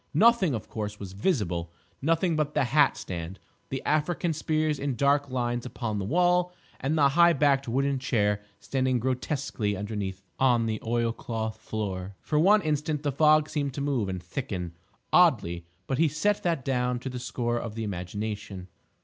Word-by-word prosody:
Nothing, 200 - +5
of 110 - -6
course, 105 -1 -5
was 95 -2 -7
visible—nothing 110 - -1
but 150 -1 -1
the 150 - +3
hat 135 +4 +3
stand, 90 +1 -6 0.3
the 135 - -4
African 160 +2 +1
spears 155 -1 0
in 140 -2 -1
dark 140 +3 +2
lines 120 -1 -1
upon 115 -4 -3
the 95 - -3
wall 180 - +2 0.3
and 145 +5 0
the 140 -2 +5
high 170 +4 +5
backed 140 -2 +2
wooden 135 +3 +1
chair 105 -5 +1 0.2
standing 130 -1 0
grotesquely 125 -4 -2
underneath 100 -2 -4 0.2
on 120 -3 +4
the 110 -1 -2
oilcloth 115 -1 -2
floor. 100 -3 -4
For 150 - 0
one 200 +5 +5
instant 150 -1 -1
the 145 - +1
fog 155 +2 +4
seemed 145 -4 -2
to 140 - -3
move 135 -8 0
and 95 -2 -4
thicken 90 -3 -4 0.4
oddly; 85 0 +3 0.2
but 135 - -2
he 165 - +5
set 200 +8 0
that 165 -7 -1
down 125 -2 0
to 125 - -6
the 125 - -5
score 120 0 -2
of 115 -3 -6
the 115 - -3
imagination. 100 0 -5
125 Hz, 165 wpm, -27 LUFS, 105-150 Hz, 0.4 s, Nothing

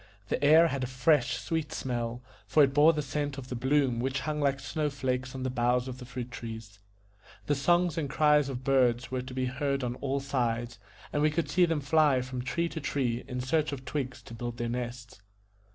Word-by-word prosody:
The - - -1
air 160 +3 +7
had 140 -2 -2
a - - -1
fresh 125 -1 +2
sweet 160 +1 -3
smell, 120 -1 -3 0.2
for 150 - +5
it 135 -1 +2
bore 150 +3 +6
the 150 -2 -2
scent 145 0 -3
of 130 -1 -8
the 125 - -3
bloom 130 -1 +1
which 130 +2 -1
hung 150 +1 -2
like 140 -1 +1
snow 150 +2 -2
flakes 130 -2 -2
on 130 - -4
the 130 - -1
boughs 125 0 +1
of 130 -1 -6
the 125 - -8
fruit 125 -1 -6
trees; 110 -3 -8 0.7
the 145 - +1
songs 175 +4 +2
and 145 -3 -2
cries 150 -1 +3
of 135 - -3
the 135 - 0
birds 125 -2 +2
were 130 -1 -1
to 130 0 -9
be 130 -1 0
heard 140 +1 -1
on 120 -1 -1
all 140 0 -1
sides, 120 -4 -2 0.3
and 145 - +1
we 155 - +4
could 155 +2 -2
see 180 0 +5
them 165 -3 0
fly 145 -2 +3
from 130 -1 -5
tree 170 +7 -1
to 160 - -6
tree 125 -4 -1
in 125 0 -3
search 150 +4 +1
of 135 -2 -6
twigs 130 -1 -4
to - - -11
build 120 +1 -5
their 120 0 -2
nests. 120 -2 -5
130 Hz, 225 wpm, -29 LUFS, 125-145 Hz, 0.7 s, air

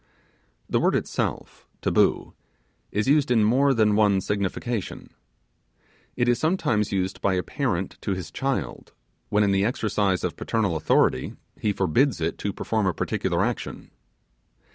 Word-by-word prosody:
The - - +1
word - - +2
itself - - -3
(taboo) - - +1 0.6
is 105 +3 -1
used 145 -1 +3
in 115 -3 +4
more 130 +6 +4
than 110 -4 +3
one 105 -2 +4
signification. 105 +3 -3 1.0
It 120 - +1
is 120 0 +2
sometimes 155 - +1
used 95 -1 -2
by 95 -2 +2
a 90 - 0
parent 100 - -2
to 100 - -1
his 90 -4 -7
child, 135 0 -3 0.4
when 105 0 +3
in 100 - +2
the 95 0 +2
exercise 105 -4 0
of - - -2
parental 105 -7 -1
authority 80 - +1 0.2
he 105 - +1
forbids 100 - +1
it 80 0 -2
to 100 - -2
perform 110 0 -1
a 90 - 0
particular - - 0
action. - - -5
105 Hz, 145 wpm, -25 LUFS, 95-120 Hz, 1.0 s, in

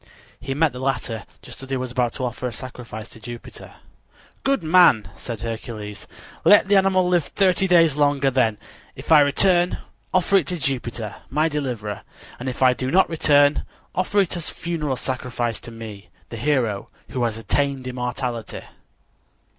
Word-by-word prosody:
He 135 - -4
met 155 0 +2
the 125 - -7
latter 125 -5 -2 0.2
just - - -10
as 135 - -10
he 135 - 0
was 130 -1 -4
about 125 -1 0
to 130 - -3
offer 125 +1 -3
a - - -4
sacrifice 115 -2 -8
to - - -12
Jupiter. 120 +1 -10 0.7
"Good 275 -8 +1
man," 160 - +5
said 115 -3 -6
Hercules, 110 -2 -6 0.4
"let 205 -2 +6
the 200 - +4
animal 190 -1 +4
live 175 -4 +2
thirty 190 -1 +2
days 165 -5 +5
longer; 145 -2 +2
then, 115 -5 +2 0.4
if - - -9
I 155 - +9
return, 175 +5 +3 0.3
offer 185 +2 +3
it 165 -7 0
to 180 - -2
Jupiter, 120 -6 -3
my 155 +4 +2
deliverer, 120 -9 -3 0.4
and 130 +1 -3
if 130 - -2
I 130 -1 +6
do 130 +1 -3
not 185 +3 +3
return, 145 -2 +4 0.3
offer 190 +3 +1
it 185 - -1
as 170 -3 -4
a - - -10
funeral 155 -5 -2
sacrifice 125 -3 -3
to 115 - -9
me, 110 -3 -9 0.2
the 115 - -7
hero 120 -6 0 0.2
who 130 - -3
has 115 -1 -2
attained 135 +4 -1
immortality." 125 -2 -4
130 Hz, 170 wpm, -22 LUFS, 120-160 Hz, 0.7 s, I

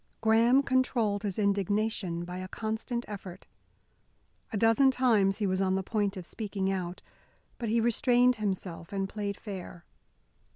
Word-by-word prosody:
Graham 230 +4 +4
controlled 245 -6 +1
his 200 -3 -3
indignation 200 -3 0
by 180 +1 -6
a 185 - -5
constant 220 +4 -3
effort. 190 -3 -8 1.1
A 220 - -2
dozen 225 +6 +5
times 225 -7 +3
he 215 - -1
was 185 0 0
on 190 -1 +2
the 190 - -1
point 205 -1 -1
of 180 - -7
speaking 195 -1 -3
out. 180 -2 -4 0.6
But 235 -3 -2
he 230 +2 +2
restrained 245 +2 +3
himself 185 -5 -4
and 195 -1 -1
played 200 0 -4
fair. 185 -4 -8
205 Hz, 150 wpm, -29 LUFS, 190-225 Hz, 1.1 s, dozen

